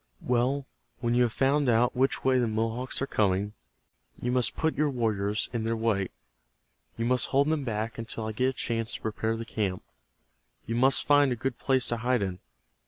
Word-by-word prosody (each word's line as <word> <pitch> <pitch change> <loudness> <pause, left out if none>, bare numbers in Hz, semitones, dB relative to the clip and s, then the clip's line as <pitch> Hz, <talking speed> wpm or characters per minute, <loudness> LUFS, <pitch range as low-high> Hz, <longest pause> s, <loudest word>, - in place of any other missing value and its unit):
Well, 125 +3 +1 0.3
when 120 -1 0
you 125 - +3
have 120 -2 +3
found 135 +3 +2
out 120 +1 +3
which 130 +2 +1
way 130 -1 +3
the 120 - +1
Mohawks 115 +5 -2
are - - +1
coming 100 -4 0 0.6
you 125 - -3
must 125 -1 +1
put 160 0 0
your 150 0 +1
warriors 110 -5 0
in 115 -2 -1
their 115 0 -1
way. 110 -4 0 0.9
You 115 - -1
must 125 +1 +2
hold 140 +2 +2
them 155 -2 0
back 110 -1 -3
until 115 -1 -5
I 110 - -3
get 130 +4 +1
a - - -3
chance 115 -2 -2
to - - -7
prepare 110 +1 -2
the 115 - -5
camp. 100 -5 -2 0.8
You 115 - -3
must 130 +3 +3
find 145 -2 +5
a - - +1
good 130 0 -3
place 130 -3 +2
to 120 - 0
hide 120 -1 +1
in. 95 -1 -4
120 Hz, 200 wpm, -28 LUFS, 110-130 Hz, 0.9 s, find